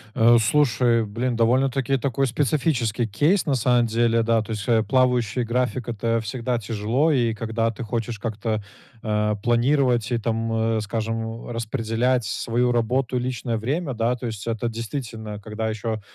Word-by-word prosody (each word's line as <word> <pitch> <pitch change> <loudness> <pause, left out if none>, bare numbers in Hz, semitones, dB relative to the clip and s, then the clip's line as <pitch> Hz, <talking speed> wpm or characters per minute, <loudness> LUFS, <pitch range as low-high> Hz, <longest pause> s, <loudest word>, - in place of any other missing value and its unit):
Э, 120 0 +6
слушай, 120 -2 +3
блин, 120 +4 -2
довольно-таки 130 +3 +2
такой 135 +1 0
специфический 125 -3 0
кейс, 155 - +2
на 145 - +1
самом 125 0 +3
деле, 115 0 +2
да. 115 -1 +2
То 110 +1 -7
есть, 105 0 -4
э, 115 -2 +3
плавающий 125 0 +2
график- 125 +1 -1
это 115 +1 0
всегда 120 +2 -2
тяжело. 115 +7 0
И 120 -5 +2
когда 115 +1 -1
ты 115 - -7
хочешь 115 0 -3
как-то, 110 -1 -3 0.4
э, 105 -1 0
планировать 120 -1 +2
и, 120 - +2
там, 115 0 -2 0.3
э, 110 - 0
скажем, 115 +2 -4
э, - - -6
распределять 115 +1 0
свою 120 +3 0
работу, 125 +2 0
личное 125 -2 -2
время, 135 +5 -2
да. 115 +2 0
То 125 - -7
есть 110 -3 -5
это 115 0 -1
действительно, 115 -2 -5
когда 110 +1 -4
еще, 110 0 -3
115 Hz, 160 wpm, -23 LUFS, 110-125 Hz, 0.4 s, Э